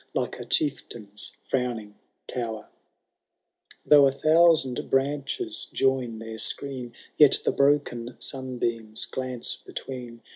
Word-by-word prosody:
Like - - -2
a - - -6
chieftain^s 110 - -2
frowning 120 -5 -2 0.3
tower; 115 -3 -5 1.2
Though 145 -2 +7
a - - +2
thousand 155 -2 +3
branches 145 - -1
join 130 -4 +1
their 110 0 -7
screen. 130 0 -3 0.2
Yet 150 -3 +6
the - - +3
broken 140 -4 +1
sunbeams 120 -4 -2
glance 130 -2 -3
between. 120 -3 -8
130 Hz, 105 wpm, -26 LUFS, 115-140 Hz, 1.2 s, Though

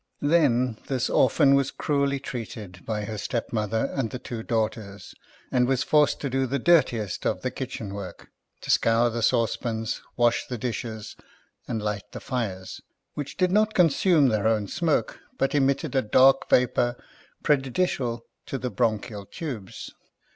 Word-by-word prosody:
Then, 130 -7 +2
this 130 -2 -1
orphan 135 +2 +4
was 140 -1 +3
cruelly 140 -1 0
treated 110 -8 -7
by 105 -2 -2
her 110 0 -5
stepmother 110 +1 -2
and 135 -5 -1
the 125 - -5
two 120 -2 -6
daughters, 110 -4 -3 0.4
and 125 -1 +3
was 130 -1 +1
forced 150 -1 +3
to 140 - -2
do 135 0 +1
the 140 +3 -1
dirtiest 120 - +2
of - - -1
the - - -1
kitchen 100 -3 -6
work; 100 -2 -8 0.3
to - - -2
scour 115 +1 +3
the 115 +1 -3
saucepans, 115 0 0 0.2
wash 120 -1 +2
the 125 - -4
dishes, 110 -2 -5 0.5
and 110 -2 -3
light 105 -1 -4
the - - -6
fires 100 -7 -4 0.2
— - - -55
which 145 -2 -6
did 185 -1 +2
not 215 +2 +2
consume 165 -4 +4
their 110 -1 +1
own 110 -2 +1
smoke, 160 - 0 0.2
but 135 - 0
emitted 140 -1 +1
a 135 - +3
dark 135 +4 +4
Tapour 125 -1 +3 0.5
prejudicial 135 -4 0 0.2
to 135 - -3
the 125 0 -4
bronchial 105 -2 -1
tubes. 120 - -7
120 Hz, 155 wpm, -25 LUFS, 110-140 Hz, 0.5 s, orphan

